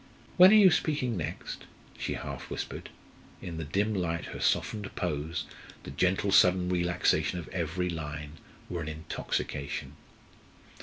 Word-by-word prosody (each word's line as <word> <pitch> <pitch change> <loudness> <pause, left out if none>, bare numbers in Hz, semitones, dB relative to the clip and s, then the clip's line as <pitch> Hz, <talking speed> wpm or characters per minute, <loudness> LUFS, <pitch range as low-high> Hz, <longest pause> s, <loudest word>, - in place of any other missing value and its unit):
"When 185 +1 +9
are 215 - +7
you 200 -4 +8
speaking 145 -7 0
next?" 85 0 -5 0.3
she - - -3
half 70 -2 -6
whispered. - - -5 0.5
In 85 -2 -6
the 80 - -3
dim 100 +8 0
light 85 -4 -1
her - - -6
softened 105 -2 0
pose, 80 -1 -2 0.4
the - - -8
gentle 95 +7 +1
sudden 90 -1 +5
relaxation 90 0 +1
of 85 - -6
every 90 +1 -2
line, 75 -3 -5 0.4
were 90 -2 -4
an 75 - -5
intoxication. 75 -2 -4
90 Hz, 140 wpm, -29 LUFS, 75-95 Hz, 0.5 s, When